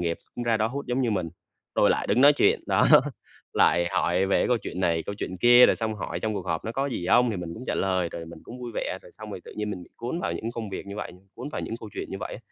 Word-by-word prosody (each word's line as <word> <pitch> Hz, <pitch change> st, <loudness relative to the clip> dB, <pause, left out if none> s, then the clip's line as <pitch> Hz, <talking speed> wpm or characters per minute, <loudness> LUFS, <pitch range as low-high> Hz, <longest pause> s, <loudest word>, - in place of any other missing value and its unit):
nghiệp 85 Hz, -1 st, -1 dB, 0.2 s
cũng 120 Hz, -, -4 dB
ra 115 Hz, -1 st, +2 dB
đó 110 Hz, -, +1 dB
hút 140 Hz, +4 st, -5 dB
giống 125 Hz, +2 st, 0 dB
như 120 Hz, -3 st, +1 dB
mình, 90 Hz, -5 st, -1 dB, 0.5 s
rồi -, -, +4 dB
lại -, -, 0 dB
đứng -, -, +2 dB
nói 145 Hz, +2 st, +8 dB
chuyện, 145 Hz, -, +3 dB
đó. -, -, +3 dB, 0.6 s
Lại 85 Hz, 0 st, +3 dB
hỏi 90 Hz, +1 st, +1 dB
về 95 Hz, -, +2 dB
cái -, -, +2 dB
câu 125 Hz, -, +3 dB
chuyện 90 Hz, -, -5 dB
này, 85 Hz, -3 st, +1 dB
câu 100 Hz, -, -3 dB
chuyện 95 Hz, -2 st, -5 dB
kia 120 Hz, +4 st, +8 dB
rồi -, -, +2 dB
xong 110 Hz, -1 st, -2 dB
hỏi 105 Hz, -, -5 dB
"trong 110 Hz, -1 st, -1 dB
cuộc 95 Hz, -3 st, -4 dB
họp 85 Hz, -2 st, -2 dB
nó 115 Hz, -, -3 dB
có 135 Hz, +3 st, -1 dB
gì 115 Hz, -10 st, -3 dB
hông". 120 Hz, +3 st, +4 dB
Thì 105 Hz, -, -3 dB
mình 85 Hz, -2 st, -5 dB
cũng 120 Hz, -, -8 dB
trả -, -, -1 dB
lời, 95 Hz, -2 st, 0 dB
rồi 85 Hz, 0 st, -7 dB
mình 85 Hz, 0 st, -10 dB
cũng 125 Hz, +1 st, -10 dB
vui 120 Hz, -1 st, -5 dB
vẻ, 95 Hz, -, -2 dB
rồi 90 Hz, -, -16 dB
xong 110 Hz, -1 st, -10 dB
rồi 100 Hz, -, -6 dB
tự -, -, -10 dB
nhiên 105 Hz, 0 st, -2 dB
mình 90 Hz, -3 st, -5 dB
bị -, -, -16 dB
cuốn 125 Hz, +9 st, -4 dB
vào -, -, -1 dB
những 115 Hz, -, -4 dB
công 115 Hz, -3 st, -5 dB
việc 95 Hz, -, -6 dB
như 100 Hz, +1 st, -7 dB
vậy 105 Hz, -, -5 dB
như, 90 Hz, -, -17 dB
cuốn 125 Hz, +4 st, -6 dB
vào -, -, -4 dB
những -, -, -4 dB
câu 110 Hz, -, -8 dB
chuyện -, -, -5 dB
như 95 Hz, -, -5 dB
vậy. 90 Hz, -, -5 dB
105 Hz, 315 wpm, -26 LUFS, 90-120 Hz, 0.6 s, nói